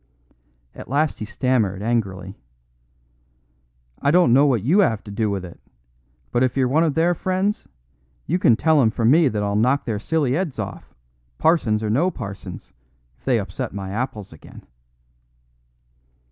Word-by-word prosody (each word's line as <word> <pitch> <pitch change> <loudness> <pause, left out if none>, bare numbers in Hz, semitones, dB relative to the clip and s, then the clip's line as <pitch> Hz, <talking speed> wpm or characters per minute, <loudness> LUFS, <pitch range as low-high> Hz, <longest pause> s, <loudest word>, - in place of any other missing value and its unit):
At - - -11
last 150 +3 0
he 110 - -4
stammered 110 -4 -1
angrily: 100 -4 -2 1.6
"I 140 - +2
don't 170 -6 +4
know 140 +3 +5
what 120 -8 +1
you 175 - +4
'ave 110 - +1
to 105 - -10
do 105 +1 -1
with 100 -2 -3
it, 85 - -12 0.7
but 120 - +1
if 130 0 +1
you're 130 -1 +3
one 150 +6 +2
of 155 -4 0
their 170 +2 +3
friends, 190 +4 -2 0.6
you 175 +4 0
can 120 - +5
tell 155 +4 +3
'em 115 - +4
from 115 +2 +1
me 160 +1 +5
that 105 -4 -1
I'll 100 0 -1
knock 125 +6 +2
their 110 -4 -2
silly 140 +1 0
'eads 170 -6 -2
off, 100 -3 -7 0.4
parsons 120 -10 +2
or 105 - -1
no 155 +11 +2
parsons, 100 - -8 0.5
if - - -34
they - - +2
upset - - -5
my 95 -1 -5
apples 110 -4 -4
again." 80 - -14
120 Hz, 165 wpm, -22 LUFS, 105-155 Hz, 1.6 s, know